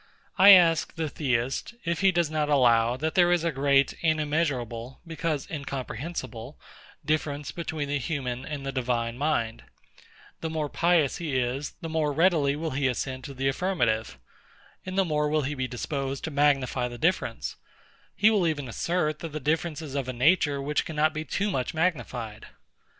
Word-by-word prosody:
I 195 +2 +9
ask 175 -4 +6
the 160 -2 -2
Theist, 135 - -1
if 170 -1 -1
he 195 -1 +5
does 170 -3 0
not 150 -1 0
allow, 120 -4 +4
that 155 +3 -2
there 175 -2 +4
is 175 -2 +2
a 170 - +1
great 140 -1 +3
and 155 -2 +2
immeasurable, 135 -6 -2
because 165 -3 -2
incomprehensible 135 -3 -6 0.5
difference 150 -2 -1
between 160 -3 -4
the 145 0 -1
human 130 -3 -3
and 145 -2 -6
the 135 - -2
divine 120 -3 -1
mind: 125 -5 -1 0.8
The 160 - -3
more 155 -2 -2
pious 170 -4 +2
he 155 -6 -2
is, 130 +3 -2
the 165 - -4
more 160 -2 0
readily 155 -3 +3
will 160 +2 -3
he 135 0 0
assent 130 +1 -3
to 140 - -8
the 135 +1 -1
affirmative, 120 - 0 0.7
and 185 +1 -4
the 195 - +4
more 150 -2 0
will 155 0 +1
he 140 +3 -2
be 130 -2 -2
disposed 135 +2 -4
to 160 - -3
magnify 135 -3 +2
the 120 0 -8
difference: 170 +9 -1 0.6
He 215 +1 +5
will 200 -6 +2
even 145 -4 -2
assert, 155 +4 -1
that 165 -3 -7
the 155 - -3
difference 160 +2 -1
is 145 -4 -7
of 140 -2 -2
a 130 - -3
nature 145 +2 +3
which 145 +2 0
cannot 155 0 0
be 155 +1 -4
too 200 +7 -1
much 130 -1 -2
magnified. 120 - -2
145 Hz, 175 wpm, -27 LUFS, 130-160 Hz, 0.8 s, I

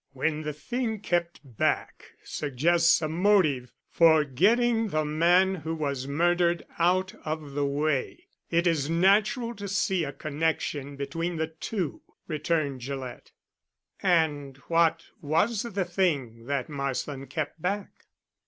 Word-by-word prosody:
"When 150 +3 -1
the 150 -1 -3
thing 225 - -3
kept 175 -3 -1
back 125 -6 -2
suggests 165 +4 +2
a - - +1
motive 160 -7 +2 0.2
for 160 -2 +5
getting 225 - +2
the 155 -5 0
man 175 +5 +3
who 165 -2 -4
was 140 -4 -3
murdered 175 +3 +1
out 185 +2 +2
of 155 -2 -4
the 140 0 0
way, 150 - -1 0.2
it 170 +1 +2
is 160 -4 +1
natural 205 +8 +3
to 205 -3 -7
see 190 -2 +1
a 145 - -3
connection 145 -2 -2
between 165 +5 -3
the 160 0 0
two," 165 0 -4 0.3
returned 155 -4 -1
Gillett. 130 -1 -6 0.7
"And 150 -7 +1
what 165 0 +3 0.2
was 180 +9 +1
the 200 -5 -2
thing 145 - -1
that 140 -2 -1
Marsland 140 -1 -4
kept 155 +2 -4
back?" 200 +3 -4
160 Hz, 130 wpm, -27 LUFS, 145-180 Hz, 0.7 s, for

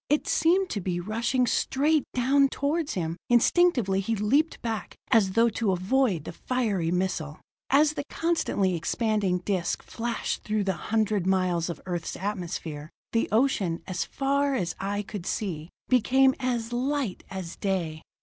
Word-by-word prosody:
It 295 +1 +2
seemed 355 +3 +2
to 205 - -2
be 175 -1 -2
rushing 230 +7 0
straight 295 +4 +1
down 275 +3 +4
toward 290 +3 -1
him; 165 -2 -2
instinctively 240 - +3
he 225 +4 -1
leaped 275 +10 +1
back, 225 -3 -4 0.2
as 205 -6 +4
though 230 +2 +4
to 215 -2 0
avoid 190 - +1
the - - -6
fiery 205 -5 -1
missile. 175 -4 -2 0.3
As 295 +2 +4
the 285 - -3
constantly 325 - 0
expanding 190 +1 0
disc 185 -4 -1
flashed 235 0 -3
through 210 -1 0
the 190 -1 0 0.2
hundred 215 -4 +1
miles 185 -3 +1
of 170 - -5
Earth's 175 -3 -3
atmosphere, 170 -6 -4 0.2
the 230 - +1
ocean, 215 -8 +1
as 185 -3 -2
far 280 0 0
as 180 -9 -1
eye 205 +1 -2
could 200 -3 -7
see, 170 -7 -3 0.2
became 265 +2 +4
as 240 -2 -2
light 260 -4 -1
as 185 -3 -6
day. 170 -6 -2
215 Hz, 150 wpm, -27 LUFS, 185-260 Hz, 0.3 s, down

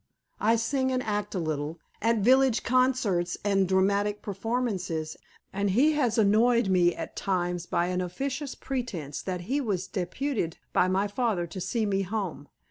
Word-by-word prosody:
I 225 +2 +3
sing 260 +3 0
and 255 -1 0
act 210 -1 -2
a - - 0
little, 155 -1 -3 0.2
at 225 0 +2
village 260 +2 +4
concerts 245 -8 +1
and 195 -2 +3
dramatic 200 +2 +1
performances, 195 -7 -2 0.4
and 200 +1 0
he 260 +11 +4
has 255 -7 +1
annoyed 225 +1 +4
me 175 -2 +3
at 165 - -6
times 175 -3 -1
by 170 - +1
an 185 0 -1
officious 270 - -3
pretense 200 - -4
that 180 -2 -4
he 265 +11 -1
was 195 -7 -1
deputed 190 - -2 0.2
by 180 - +4
my 190 +2 +1
father 205 -4 0
to 175 +3 -7
see 215 +5 -1
me 195 -1 +1
home. 190 -7 -4
200 Hz, 160 wpm, -28 LUFS, 180-240 Hz, 0.4 s, village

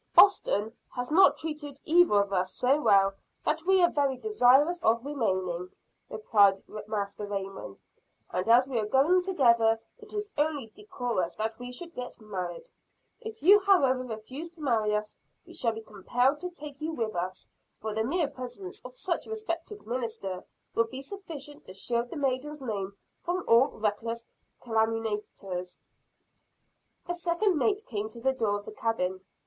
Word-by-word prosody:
"Boston 225 - +5 0.2
has 245 +3 -3
not 315 -4 +6
treated 295 -3 -5
either 320 -12 +5
of 200 0 -7
us 185 0 0
so 275 +4 +2
well 195 -5 +5 0.3
that 310 +1 +1
we 380 -1 +5
are 345 - +5
very 280 -3 +1
desirous 320 - +4
of 230 +3 +2
remaining," 185 -10 -1 0.4
replied 205 -2 +3 0.2
Master 205 -1 -3
Raymond. 195 - -6 0.5
"And 185 +4 -1
as 245 +3 +6
we 255 -4 -1
are 210 - -1
going 290 +10 +4
together, 235 -11 +3 0.2
it - - -14
is 415 0 -4
only 290 -7 0
decorous 245 - -3
that 220 +1 -3
we 245 0 -6
should 340 +7 -8
get 250 0 -7
married. 195 - -6 0.5
If 445 -9 -8
you 400 +5 +8
however 320 -11 +4
refuse 255 +7 -7
to 325 - -14
marry 220 -6 +2
us, 210 0 -4 0.3
we - - -13
shall 230 -3 0
be 225 - -7
compelled 245 +7 +1
to 360 - -4
take 300 -4 -9
you 320 +1 -2
with 225 -7 -2
us 180 +2 -4 0.3
for 220 0 -4
the 220 +1 0
mere 310 +6 +1
presence 285 - -8
of - - -10
such - - -2
a - - -11
respected 420 -2 -5
minister 220 -6 -4 0.3
will 230 0 +2
be 260 +3 -5
sufficient 295 -5 -8
to 185 - -11
shield 235 +4 -1
the - - -6
maiden's 285 +2 -1
name 200 -6 -4 0.2
from 360 +1 -2
all 235 +4 +6
reckless 230 +2 -3 0.4
calumniators." 220 -5 -2 1.3
The 350 - -2
second 350 +1 +1
mate 415 +6 +1
came 215 -2 -3
to 235 - -12
the 265 +3 +1
door 220 -5 0
of 205 - -10
the - - -7
cabin. 190 -5 -1
245 Hz, 165 wpm, -29 LUFS, 215-310 Hz, 1.3 s, you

